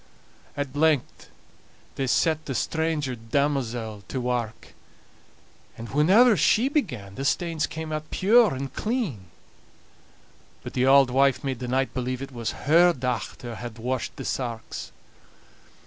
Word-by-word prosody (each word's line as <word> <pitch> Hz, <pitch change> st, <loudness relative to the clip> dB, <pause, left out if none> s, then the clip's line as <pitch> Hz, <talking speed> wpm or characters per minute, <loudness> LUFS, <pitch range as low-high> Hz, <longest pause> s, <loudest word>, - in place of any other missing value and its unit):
At 145 Hz, -1 st, -4 dB
length 150 Hz, -3 st, +1 dB, 0.6 s
they 135 Hz, -, -2 dB
set 155 Hz, +4 st, +1 dB
the 135 Hz, -, -3 dB
stranger 160 Hz, -5 st, -1 dB
damosel 120 Hz, -3 st, -2 dB
to 130 Hz, -, -3 dB
wark; 120 Hz, -3 st, -3 dB, 1.1 s
and 115 Hz, +1 st, -8 dB
whenever 200 Hz, -, +5 dB
she 210 Hz, -, +3 dB
began 125 Hz, -, -2 dB
the 135 Hz, -, -5 dB
stains 165 Hz, +2 st, 0 dB
came 160 Hz, 0 st, -6 dB
out 155 Hz, 0 st, -4 dB
pure 215 Hz, -, +4 dB
and 135 Hz, +1 st, -5 dB
clean, 210 Hz, -, -2 dB, 1.4 s
but -, -, -7 dB
the 130 Hz, +1 st, +1 dB
auld 135 Hz, -1 st, +6 dB
wife 135 Hz, +2 st, +3 dB
made 135 Hz, -3 st, -3 dB
the 125 Hz, -, -5 dB
knight 130 Hz, +2 st, 0 dB
believe 130 Hz, +1 st, -3 dB
it 135 Hz, -, -8 dB
was 120 Hz, -3 st, -4 dB
her 170 Hz, +4 st, +6 dB
dochter 125 Hz, -2 st, -4 dB
had 120 Hz, -2 st, -7 dB
washed 125 Hz, +2 st, -3 dB
the -, -, -7 dB
sarks. 120 Hz, -3 st, -4 dB
135 Hz, 135 wpm, -25 LUFS, 125-160 Hz, 1.4 s, auld